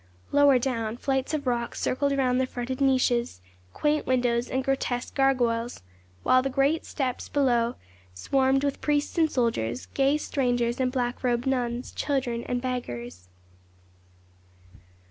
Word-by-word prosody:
Lower 285 -2 +6
down, 230 -3 -2
flights 265 +1 -1
of 305 -2 -2
rooks 240 -2 -1
circled 280 +2 0
round 255 -1 +2
the 260 - 0
fretted 255 +1 -5
niches, 250 - +2 0.3
quaint 300 0 0
windows, 245 -1 +1
and 260 0 -1
grotesque 260 -2 -2
gargoyles, 240 - +1 0.4
while 255 - +5
the 270 - -2
great 275 +4 +1
steps 260 -4 -3
below 245 -4 +2 0.4
swarmed 265 - +1
with 280 -1 -1
priests 295 +2 0
and 320 -1 +4
soldiers, 130 - -1
gay 275 +2 +3
strangers 245 -5 0
and 255 -1 +1
black 250 -1 -2
robed 240 -1 +1
nuns, 245 -2 -1
children 260 -5 -1
and 245 0 -2
beggars. 120 - -5
255 Hz, 135 wpm, -26 LUFS, 240-270 Hz, 0.4 s, Lower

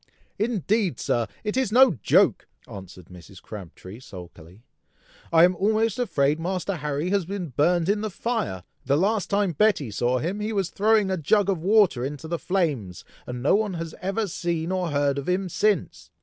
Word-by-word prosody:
"Indeed, 210 - 0
Sir! 120 -2 0 0.2
it 210 +1 -2
is 260 -5 0
no 255 +1 +6
joke," - - +3 0.2
answered 95 -2 -11
Mrs. 90 +1 -13
Crabtree, 100 0 -10
sulkily; 90 -2 -13 0.7
"I 165 0 +6
am 180 +1 +4
almost 215 +4 +1
afraid 150 - +1
Master 185 +2 -2
Harry 150 +3 -2
has 200 -2 +2
been 185 -2 -5
burned 165 +6 +1
in 205 +1 +1
the 215 - -2
fire! 210 - -3 0.2
The 140 +2 +1
last 200 +4 0
time 200 -2 +1
Betty 155 - +1
saw 120 +4 0
him, 175 +10 -3
he 215 +1 -3
was 195 -4 -1
throwing 210 -1 +2
a 190 - 0
jug 200 +5 +2
of 185 - -2
water 195 - +3
into 145 +3 -5
the 170 0 -3
flames, 145 - -2 0.2
and 125 0 -6
no 145 - +3
one 205 -2 +1
has 165 -1 -5
ever 195 +4 -1
seen 170 -2 -3
or 185 -2 -1
heard 140 -1 0
of 140 - -5
him 185 +1 0
since! 205 0 -1
175 Hz, 180 wpm, -24 LUFS, 140-205 Hz, 0.7 s, no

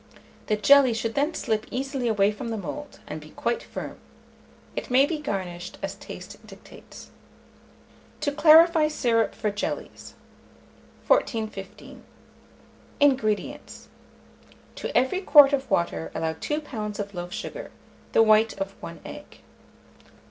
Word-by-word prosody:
The 215 - +2
jelly 260 +2 +5
should 225 0 -2
then 290 +4 0
slip 220 -1 -2
easily 265 0 -3
away 205 -2 +3
from 230 +3 -6
the 225 - -3
mould, 285 - -7
and 155 +1 -7
be 155 - -13
quite 235 +8 -2
firm. - - -8 0.8
It - - -5
may 260 +2 +5
be 310 +1 -3
garnished 180 -9 -5
as - - -2
taste - - -11
dictates. - - -14 1.1
TO 300 -1 -1
CLARIFY 315 +1 +6
SYRUP 235 -6 +1
FOR 210 -1 -1
JELLIES. 290 +9 -5 0.9
1415. 220 - -2 1.0
INGREDIENTS. 260 -7 0 0.8
To - - -3
every 260 +10 +1
quart 290 -6 +7
of 270 -1 -1
water 80 - -1
allow 160 0 -1
2 295 - -3
lbs. 215 -8 -5
of 205 -1 -5
loaf 175 -1 -6
sugar; - - -6 0.4
the 225 - +6
white 215 -1 +3
of 195 0 -3
1 - - -9
egg. - - -11
230 Hz, 130 wpm, -25 LUFS, 205-285 Hz, 1.1 s, quart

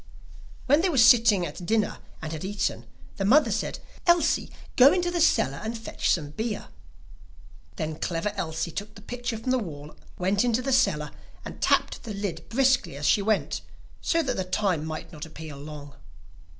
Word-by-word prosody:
When 290 +4 +4
they 375 - +2
were 305 - -1
sitting 230 -6 +6
at 155 +3 -7
dinner 215 +3 0 0.2
and 160 - -4
had 155 - -6
eaten, 200 +1 -2 0.3
the 195 - -1
mother 275 +10 +5
said: - - -2 0.3
'Elsie, 345 -3 +3 0.3
go 265 +3 +8
into 355 -1 +1
the 345 -1 0
cellar 140 - +2
and 225 +1 -3
fetch 225 - -3
some 150 -4 +1
beer.' 220 - -4 1.1
Then 155 0 -4
Clever 175 +4 -1
Elsie 165 -3 -3
took 205 +5 -6
the 205 - -13
pitcher 245 0 -4
from 255 +4 -2
the 260 - +3
wall, 150 -7 -8 0.2
went 195 +4 +1
into 245 0 +1
the 270 0 0
cellar, 150 - +2 0.3
and - - -9
tapped - - +2
the 215 -4 -6
lid 195 -5 -5
briskly 260 - +2
as 145 - -4
she 205 - +4
went, 215 +1 0 0.4
so 330 -1 +1
that 265 - -2
the 190 - 0
time 185 -4 0
might 160 +1 -6
not 155 -1 -8
appear 160 -2 -8
long. 145 0 -9
205 Hz, 180 wpm, -26 LUFS, 160-245 Hz, 1.1 s, go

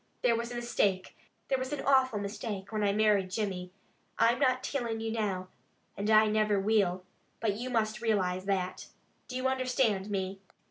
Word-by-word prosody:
There 235 -2 +4
was 235 +1 -3
a - - -5
mistake. 205 -6 0 0.3
There 265 - +1
was 260 +1 -4
an 295 - -3
awful 260 -4 +4
mistake, 200 -1 -5
when 215 -1 -1
I 200 - +3
married 205 -2 +3
Jimmy. 185 -3 -3 0.5
I'm 235 +1 +3
not 255 0 +2
tillin' 235 -5 -2
you 225 0 -3
now, 195 -5 -2 0.5
and 205 +2 -2
I 215 0 +7
niver 215 -1 +2
will, 195 -3 +1 0.4
but 220 -3 +1
you 245 +4 -4
must 220 -2 0
realize 190 -5 0
that! 185 -2 -2 0.4
Do 250 - -7
you 255 +1 0
understand 255 -6 +1
me?" 195 -1 -3
215 Hz, 175 wpm, -30 LUFS, 195-235 Hz, 0.5 s, I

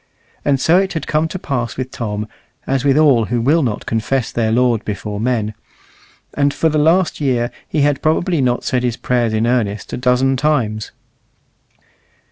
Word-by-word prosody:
And 140 -2 +2
so 170 +6 +4
it 195 0 -1
had 160 - -3
come 155 +1 +1
to 185 - -5
pass 125 -9 -3
with 130 0 -4
Tom, 105 -2 -4 0.4
as 135 -1 0
with 140 0 +3
all 140 -7 +4
who 120 +2 -1
will 145 +8 +3
not 115 -7 -2
confess 115 +2 -1
their 110 -2 0
Lord 120 -1 +2
before 105 0 -4
men; 110 -2 -1 0.8
and 140 -1 +2
for 160 - +1
the 155 0 +1
last 165 +2 +2
year 125 -4 0 0.2
he 155 - -1
had 145 -1 +1
probably 160 +1 +1
not 125 -1 0
said 125 - 0
his 125 -1 -1
prayers 120 -2 0
in 110 +1 0
earnest 115 -4 -1
a - - -2
dozen 125 +1 +2
times. 125 -7 0
125 Hz, 180 wpm, -18 LUFS, 115-145 Hz, 0.8 s, so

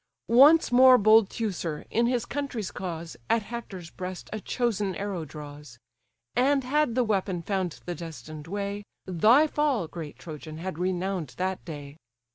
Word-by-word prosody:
Once 285 +8 +6
more 255 +1 +8
bold 215 -1 +5
Teucer, 180 -8 -3
in 235 +1 +2
his 245 -1 0
country's 275 -8 -4
cause, 170 -3 -6
At 230 -2 +2
Hector's 200 -6 -7
breast 185 0 -7
a 215 - -3
chosen 210 -5 -1
arrow 195 -4 -3
draws: 145 -4 -10 0.6
And 275 +2 +3
had 280 -1 +1
the 255 - +3
weapon 190 -5 -1
found 185 -3 -2
the 175 - -3
destined 155 -2 -9
way, 200 +2 -3 0.2
Thy 215 - +5
fall, 290 - 0
great 155 -2 -8
Trojan! 155 -1 -8
had 175 -1 -5
renown'd 185 -4 -2
that 185 0 -2
day. 145 -3 -8
190 Hz, 150 wpm, -27 LUFS, 165-235 Hz, 0.6 s, more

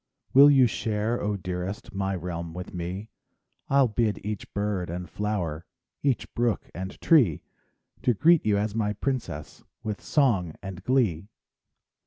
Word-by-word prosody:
Will 140 +2 +9
you 135 -3 +6
share, 110 0 -1
oh, 105 0 -1
dearest, 90 +3 -5
My 95 0 -1
realm 85 -1 -5
with 90 0 -7
me? 90 +5 -5 0.6
I'll 135 -1 +5
bid 110 -1 0
each 105 -2 -5
bird 100 -4 -2
and 90 +1 -4
flower, 90 -6 -3 0.3
Each 135 -4 +1
brook 120 -3 -1
and 95 +2 -6
tree, 125 - +4 0.6
To 125 - +2
greet 165 - +5
you 105 -1 +2
as 105 0 -1
my 105 -2 0
princess 105 - -4 0.2
With 105 -2 -4
song 100 - +1
and 95 -1 -7
glee. 105 -10 +1
105 Hz, 145 wpm, -27 LUFS, 90-120 Hz, 0.6 s, Will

